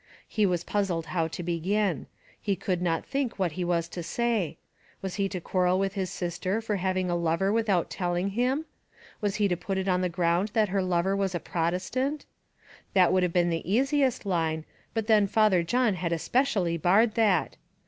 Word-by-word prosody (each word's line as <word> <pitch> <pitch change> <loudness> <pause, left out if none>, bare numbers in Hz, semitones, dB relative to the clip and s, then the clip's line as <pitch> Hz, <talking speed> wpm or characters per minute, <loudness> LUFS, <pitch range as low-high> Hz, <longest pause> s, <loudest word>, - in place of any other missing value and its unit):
He 210 -3 +2
was 175 -2 0
puzzled 185 -6 -1
how 165 -3 +1
to 170 +2 -6
begin; 185 +5 0 0.3
he 200 -2 0
could 180 -1 -2
not 165 -2 0
think 275 -3 -2
what 185 -4 0
he 180 +4 -3
was 170 -1 0
to 175 - -5
say; 205 -2 -1 0.4
was 190 -2 -5
he 195 - +1
to 185 - -4
quarrel 180 +1 +1
with 195 0 0
his 190 -2 -2
sister 180 +2 -2
for 220 -2 -2
having 185 0 0
a - - +1
lover 170 +4 +1
without 210 -6 +1
telling 180 +1 -1
him? 250 +8 0 0.6
was 205 -1 0
he 210 -1 +2
to 180 - 0
put 190 +3 -3
it 190 0 -2
on 180 -1 +2
the 180 - 0
ground 175 +3 +1
that 215 -3 +3
her 195 +1 +1
lover 185 +1 +1
was 195 -2 -1
a - - 0
Protestant? 185 - -2 0.7
That 185 -2 +5
would 185 - +3
have 180 -1 +1
been 175 0 +2
the 165 +2 -3
easiest 265 +1 +2
line, 160 -4 -1 0.3
but 225 -2 0
then 215 -2 +4
Father 210 -3 +3
John 235 +6 +2
had 175 -2 -3
especially 185 - +1
barred 200 +7 +4
that! 205 -7 +2
185 Hz, 195 wpm, -27 LUFS, 175-210 Hz, 0.7 s, That